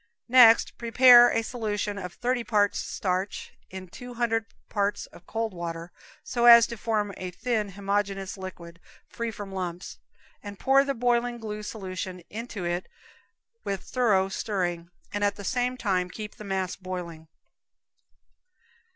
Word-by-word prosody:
Next 235 -2 +6
prepare 245 +1 +7
a 225 - 0
solution 210 -3 -3
of 180 -2 -7
thirty 245 0 -1
parts 205 -3 +1
of - - -7
starch 185 +1 -3 0.2
in 185 0 -8
two 245 +7 -10
hundred 225 -1 0 0.2
parts 205 -1 -1
of 175 - -17
cold 225 -2 -2
water, 170 0 -6 0.3
so 240 -1 +1
as 235 -1 +10
to 235 0 -7
form 210 -2 -1
a 185 - -5
thin 220 +2 -2
homogeneous 200 -1 -2
liquid, 170 -3 -9 0.3
free 235 -1 -4
from 205 -3 -8
lumps, 180 -2 -5 0.4
and 205 -1 -8
pour 270 +4 +4
the 275 0 -2
boiling 240 0 +1
glue 210 -2 -6
solution 185 -4 -6
into 220 -4 -6
it 175 +1 -2 0.8
with 195 -1 -3
thorough 210 -7 +2
stirring, 180 -4 -3 0.2
and 205 0 -1
at 205 0 +2
the 205 - -9
same 250 +3 -1
time 185 -6 0
keep 210 +2 -8
the - - -9
mass 190 -2 -2
boiling. 175 -4 -7
205 Hz, 150 wpm, -27 LUFS, 185-235 Hz, 0.8 s, as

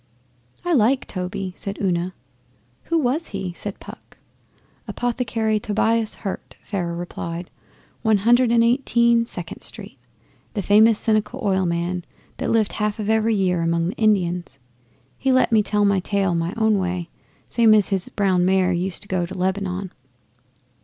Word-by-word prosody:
'I 350 - +1
like 255 0 +3
Toby,' 185 0 -4
said 200 0 -6
Una. 180 -1 -1 0.7
'Who 335 - +1
was 300 +3 0
he?' 195 -3 -5
said 200 +3 -6
Puck. - - -13 0.7
'Apothecary 230 -3 -1
Tobias 220 +2 0
Hirte,' 195 - -5
Pharaoh 175 -4 -3
replied. 170 0 -6 0.5
'One 220 -2 +3
Hundred 240 +4 +4
and 235 -1 +4
Eighteen, 235 -1 +3
Second - - -5
Street - - -7 0.6
the 200 - -1
famous 215 +3 +5
Seneca 215 -1 0
Oil 190 -3 +1
man, 170 +1 -2 0.3
that - - -2
lived 220 -2 +2
half 210 -1 -1
of 215 0 -1
every 220 0 +2
year 180 -3 +1
among 165 +1 +1
the - - -4
Indians. 180 -7 +1 0.7
But 265 -1 +3
let 255 - +3
me 220 -2 +5
tell 210 0 +1
my 200 -1 +3
tale 195 -1 0
my 170 +2 -2
own 220 -2 +3
way, 180 -2 -3 0.4
same 225 -2 +5
as 210 -2 +3
his 190 -3 -1
brown 190 -3 +1
mare 185 0 +3
used 180 +3 -2
to - - -9
go 185 -3 -1
to 190 +2 -8
Lebanon. 190 0 -2
200 Hz, 155 wpm, -22 LUFS, 180-220 Hz, 0.7 s, famous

